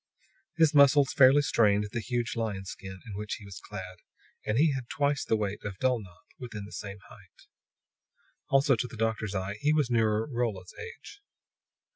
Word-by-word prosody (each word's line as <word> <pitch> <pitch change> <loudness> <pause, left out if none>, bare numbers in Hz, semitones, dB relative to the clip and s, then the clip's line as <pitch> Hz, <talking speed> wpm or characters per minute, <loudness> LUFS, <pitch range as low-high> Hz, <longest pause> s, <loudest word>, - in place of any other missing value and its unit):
His 160 -2 +4
muscles 140 -1 +6
fairly 140 +2 +6
strained 105 -5 +2
the 120 - -2
huge 120 +1 -2
lion's 105 -4 -3
skin 95 -1 -9
in 110 - -8
which 105 +2 -4
he 105 - -12
was 100 -2 -9
clad, 95 -3 -7 0.5
and 105 +1 +1
he 150 +1 +4
had 130 -3 -5
twice 145 -1 0
the - - +1
weight 105 -1 -3
of 105 -3 -5
Dulnop 110 -9 -2 0.2
within 110 -5 -7
the 105 - -12
same 100 -1 -7
height. 100 -7 -18 1.0
Also, 135 0 +4
to 125 +2 -2
the 115 - -11
doctor's 110 -2 -1
eye, 95 +2 -3
he 150 - +3
was 150 -5 +1
nearer 110 -2 +2
Rolla's 115 -8 -3
age. 455 -3 -10
115 Hz, 175 wpm, -29 LUFS, 100-130 Hz, 1.0 s, muscles